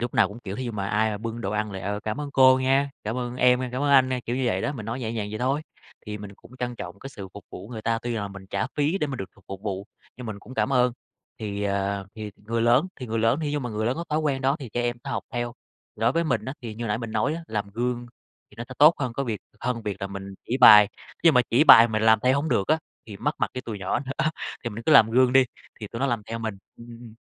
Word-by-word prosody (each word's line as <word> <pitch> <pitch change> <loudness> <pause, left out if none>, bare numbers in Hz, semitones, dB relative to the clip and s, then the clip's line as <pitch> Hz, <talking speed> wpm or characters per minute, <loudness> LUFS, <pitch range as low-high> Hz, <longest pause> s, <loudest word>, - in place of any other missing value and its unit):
lúc 120 0 -3
nào - - +4
cũng 105 - -10
kiểu, 100 -3 -6
thí 130 - -4
dụ 120 - -4
mà 100 -2 -3
ai 110 +2 +2
mà 105 - -4
bưng 115 +1 -5
đồ 100 - -3
ăn 105 0 -1
là 95 - -5
"Ờ, 105 +1 -3
cảm 110 +6 -4
ơn 145 -1 -5
cô 130 -1 +6
nha! 135 +2 +2
Cảm 110 +3 -2
ơn 125 -1 -4
em 125 0 +4
nha! 125 - -2
Cảm 130 +3 -2
ơn 145 - +2
anh 130 -2 +6
nha!" 130 -1 -1
kiểu 120 - -1
như 130 - -1
vậy - - +1
đó, - - -1
mình 110 -7 -7
nói 120 +3 -3
nhẹ 115 -2 -3
nhàng 105 -3 -3
vậy 110 - -5
thôi, 135 +4 0 0.5
thì 105 0 -5
mình 100 -1 -9
cũng 125 +5 -17
trân 125 -1 -3
trọng 90 -1 -8
cái 135 - -9
sự 100 -7 -9
phục 100 - -10
vụ 100 +4 -9
người 110 -3 -7
ta, 115 +1 0
tuy 120 - -3
là 100 -3 -3
mình 100 -1 -11
trả 100 +2 -2
phí 150 +6 +1
để 150 - 0
mà 135 - -4
được 95 - -6
phục 100 - -23
phục 95 +1 -7
vụ, 100 -1 -4 0.3
nhưng 125 -1 -8
mình 105 -2 -5
cũng 120 +5 -12
cảm 135 - 0
ơn. 125 -1 +3 0.5
Thì, 105 -2 -4
ờ, 100 -1 -1
thì 110 -2 -6
người 115 +2 -2
lớn 120 +7 +4
thì 125 - -7
người 115 0 -2
lớn 115 +6 +2
thí 150 -2 -2
dụ 150 - 0
mà 125 -3 -4
người 110 0 -2
lớn 120 - +1
có 170 - -4
thói 150 - +2
quen 145 -4 0
đó 135 +2 +2
thì 130 -6 -7
trẻ 120 +3 -2
em 120 0 -1
học - - -3
theo. 120 0 -2 0.4
Thì - - -14
đối 115 +3 +3
với 170 0 +1
mình 130 -9 0
á, 130 - -4
thì 115 -2 -6
như 120 +2 -5
hồi - - -3
nãy 105 +1 0
mình 115 -2 -5
nói 130 +8 +1
á, 170 - -6
làm 105 -5 -3
gương 120 +2 -2 0.4
thì - - -18
nó 120 - -5
sẽ 130 - -8
tốt 155 +4 +8
hơn 130 -4 -2
cái 140 +3 -2
việc 110 -5 -3 0.2
hơn 120 -1 -2
việc 105 -3 -3
là 100 - -2
mình 95 0 -8
chỉ 125 - -1
bài, 105 -5 +9 0.4
nhưng 165 -3 +7
mà 125 - +7
chỉ 125 +6 +5
bài 115 -6 +9
mình 110 -1 -1
làm 110 0 +6
theo 130 +1 +4
hổng 160 - -3
được 100 -6 +1
á 155 - +4 0.3
thì 105 - -8
mất 150 +8 -1
mặt - - +1
với 125 - -3
tụi 110 -3 -6
nhỏ 95 -1 -1
nữa, 135 +2 -1 0.3
thì 120 - -2
mình 115 +2 -7
cứ 155 - +5
làm 115 -6 +7
gương 125 +1 +4
đi, 130 0 +6 0.4
thì 105 - -5
tụi 115 +3 -7
nó 135 - +2
làm 120 -5 -1
theo 115 +1 -4
mình. 110 -3 -4 0.2
Ừm, 115 - -12
ừm, 115 -1 -10
ừm. 115 -3 -12
115 Hz, 315 wpm, -25 LUFS, 105-130 Hz, 0.5 s, bài